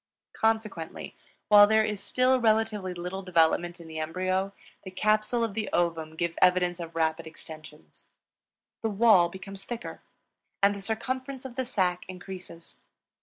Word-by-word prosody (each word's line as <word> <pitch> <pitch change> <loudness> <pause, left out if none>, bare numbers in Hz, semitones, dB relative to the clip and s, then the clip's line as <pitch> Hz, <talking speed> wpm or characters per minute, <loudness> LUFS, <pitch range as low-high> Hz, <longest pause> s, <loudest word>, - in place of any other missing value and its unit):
Consequently, 220 -7 -2 0.3
while 205 -1 +8
there 220 0 +4
is 210 -2 -3
still 255 +4 +2
relatively 215 -4 +1
little 180 +2 -5
development 175 -1 +2
in 170 - -11
the 160 0 -6
embryo, 185 +4 -1 0.3
the 190 - -7
capsule 215 +4 +1
of 225 -3 -2
the 215 -1 -3
ovum 165 -2 -1
gives 170 0 -2
evidence 180 -1 +3
of 165 -1 -7
rapid 160 0 0
extension; 155 -1 -11 1.0
the 225 - 0
wall 200 -4 +5
becomes 195 +2 -8
thicker, 240 0 -7 0.6
and 200 0 +6
the 200 - -7
circumference 260 +5 -4
of 250 -2 -8
the 260 -2 -2
sac 180 -6 0
increases. 180 -2 -10
190 Hz, 145 wpm, -28 LUFS, 170-220 Hz, 1.0 s, while